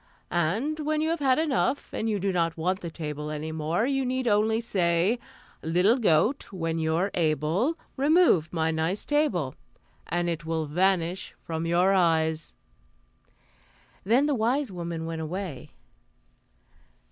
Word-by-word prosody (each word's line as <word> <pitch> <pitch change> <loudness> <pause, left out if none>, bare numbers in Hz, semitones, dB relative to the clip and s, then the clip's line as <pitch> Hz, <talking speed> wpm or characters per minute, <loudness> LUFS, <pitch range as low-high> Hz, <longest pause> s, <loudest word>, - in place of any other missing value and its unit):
And 210 - 0
when 305 0 0
you 315 +1 +1
have 335 - -1
had 265 -3 +3
enough, 290 -2 0
and 225 - -1
you 210 - 0
do 195 +1 0
not 165 -2 0
want 185 +4 0
the 170 - -6
table 150 -2 -5
any 155 +1 -4
more, 160 +6 0
you 270 0 0
need 255 0 -1
only 220 +1 +3
say: 190 0 +1 0.4
"'Little 180 +10 +3
goat, 210 - +2
when 165 -3 -2
you're 160 +5 0
able, 165 - +1 0.2
Remove 285 - +4
my 160 -1 0
nice 160 +5 -1
table,' 210 - +1 0.5
"and 175 0 -1
it 165 -1 -2
will 160 -1 -2
vanish 180 +3 0
from 165 0 -3
your 180 +3 +3
eyes." 160 -3 +1 1.5
Then 240 +8 +3
the 295 - +1
wise 250 +2 0
woman 170 -2 -4
went 165 0 -4
away. 160 -4 -5
180 Hz, 145 wpm, -27 LUFS, 160-235 Hz, 1.5 s, Remove